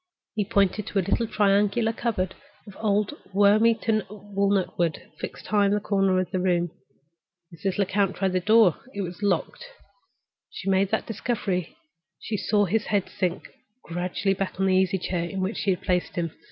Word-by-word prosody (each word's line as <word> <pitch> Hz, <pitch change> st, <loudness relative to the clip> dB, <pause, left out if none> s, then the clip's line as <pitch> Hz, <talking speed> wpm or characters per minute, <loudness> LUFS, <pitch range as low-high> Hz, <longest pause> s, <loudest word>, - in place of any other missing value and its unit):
He 215 Hz, -, 0 dB
pointed 200 Hz, -1 st, +1 dB
to -, -, -3 dB
a 190 Hz, -, +2 dB
little 230 Hz, +3 st, +1 dB
triangular 210 Hz, +1 st, +2 dB
cupboard 200 Hz, -6 st, -1 dB, 0.3 s
of 200 Hz, -3 st, -12 dB
old 210 Hz, +2 st, +1 dB, 0.2 s
worm 205 Hz, +3 st, +5 dB
eaten 225 Hz, -1 st, +2 dB
walnut 200 Hz, -2 st, -1 dB
wood 165 Hz, -4 st, +1 dB, 0.2 s
fixed -, -, -7 dB
high 205 Hz, -1 st, +3 dB
in 200 Hz, -, +2 dB
a -, -, +1 dB
corner 195 Hz, -2 st, +2 dB
of 185 Hz, -, -2 dB
the 185 Hz, -, 0 dB
room. 175 Hz, -2 st, +1 dB, 0.8 s
Mrs. 185 Hz, +4 st, -3 dB
Lecount 195 Hz, -1 st, +1 dB
tried 190 Hz, -2 st, 0 dB
the 185 Hz, -, +2 dB
door: 215 Hz, -2 st, +5 dB, 0.2 s
it 200 Hz, -, -2 dB
was 180 Hz, 0 st, -6 dB
locked. 200 Hz, -, 0 dB
As -, -, -22 dB
she 195 Hz, -, -2 dB
made 190 Hz, 0 st, +3 dB
that 220 Hz, -, 0 dB
discovery, 205 Hz, -6 st, -2 dB, 0.4 s
she 225 Hz, -, -4 dB
saw 205 Hz, +1 st, +2 dB
his 210 Hz, +3 st, 0 dB
head 200 Hz, -3 st, 0 dB
sink 180 Hz, -1 st, -2 dB
back -, -, -15 dB, 0.3 s
gradually 180 Hz, +3 st, -1 dB
on 195 Hz, 0 st, -1 dB
the 190 Hz, -, +3 dB
easy 190 Hz, +1 st, +2 dB
chair 175 Hz, -1 st, -2 dB
in 195 Hz, -, -4 dB
which 190 Hz, +4 st, -2 dB
she -, -, -1 dB
had 185 Hz, -, +1 dB
placed 180 Hz, -1 st, 0 dB
him. 170 Hz, -2 st, -1 dB
195 Hz, 185 wpm, -25 LUFS, 185-210 Hz, 0.8 s, worm